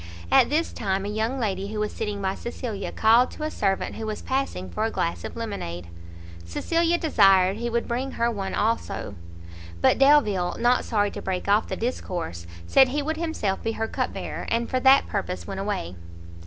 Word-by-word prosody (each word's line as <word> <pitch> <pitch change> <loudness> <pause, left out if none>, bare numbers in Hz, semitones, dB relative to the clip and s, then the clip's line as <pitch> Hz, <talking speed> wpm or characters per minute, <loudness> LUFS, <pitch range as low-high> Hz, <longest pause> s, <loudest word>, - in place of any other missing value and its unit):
At - - +6
this 315 +4 0
time 195 -2 -1
a - - -3
young 220 +5 -1
lady 195 -4 -1
who 215 +1 -4
was 210 0 -1
sitting 205 -2 -4
by 190 0 0
Cecilia, 225 -2 -5
called 230 +3 +4
to 305 - -7
a 310 - -2
servant 195 -2 -1
who 220 - -4
was 215 - -4
passing, 265 - -2
for 85 - -3
a - - +1
glass 85 0 -2
of - - -6
lemonade; 90 - -5 0.5
Cecilia 335 - +1
desired 195 - +4
he 235 +1 -2
would 235 0 -1
bring 255 +3 -2
her 235 0 +1
one 195 -3 -3
also; 220 - -1 0.7
but - - +3
Delvile, 215 -11 +4
not 245 +1 +3
sorry 205 -2 +1
to - - -7
break 185 0 -3
off 205 +2 +3
the - - -3
discourse, 175 - -4 0.2
said 265 - +6
he 285 +3 -1
would 315 +2 -2
himself 320 - -2
be 225 - -2
her 225 0 -2
cup - - -2
bearer, - - -5
and 230 0 0
for 255 - +1
that 265 +2 +6
purpose 190 -3 -3
went 195 -1 -5
away. 195 - -3
215 Hz, 195 wpm, -25 LUFS, 195-250 Hz, 0.7 s, At